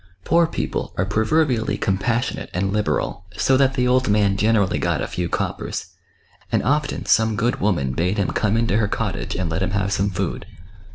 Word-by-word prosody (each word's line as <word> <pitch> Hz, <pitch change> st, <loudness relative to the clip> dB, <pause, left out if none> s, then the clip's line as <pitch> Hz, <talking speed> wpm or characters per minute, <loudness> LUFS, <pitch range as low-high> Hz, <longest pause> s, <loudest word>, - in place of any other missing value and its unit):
Poor 170 Hz, 0 st, +4 dB
people -, -, -3 dB
are 95 Hz, -, +1 dB
proverbially 110 Hz, +4 st, +1 dB
compassionate 115 Hz, +6 st, -1 dB
and 95 Hz, +2 st, 0 dB
liberal, 105 Hz, -3 st, -1 dB
so 130 Hz, -, +3 dB
that 135 Hz, 0 st, +3 dB
the 125 Hz, -1 st, +1 dB
old 130 Hz, -2 st, +2 dB
man 100 Hz, -1 st, +3 dB
generally 105 Hz, -1 st, +2 dB
got -, -, 0 dB
a -, -, -1 dB
few 90 Hz, -1 st, -3 dB
coppers, -, -, -3 dB, 0.6 s
and -, -, +1 dB
often 145 Hz, +4 st, 0 dB
some 110 Hz, -1 st, +3 dB
good 120 Hz, +4 st, 0 dB
woman 90 Hz, -10 st, +1 dB
bade 90 Hz, +9 st, 0 dB
him 100 Hz, -, 0 dB
come 110 Hz, 0 st, +1 dB
iiito 115 Hz, -2 st, +2 dB
her 110 Hz, -, +2 dB
cottage, -, -, -3 dB
and 90 Hz, -2 st, -1 dB
let 80 Hz, -, -1 dB
him 95 Hz, -, 0 dB
have 100 Hz, 0 st, -1 dB
some 100 Hz, +1 st, +1 dB
food. 95 Hz, -1 st, -3 dB
105 Hz, 185 wpm, -22 LUFS, 95-120 Hz, 0.6 s, Poor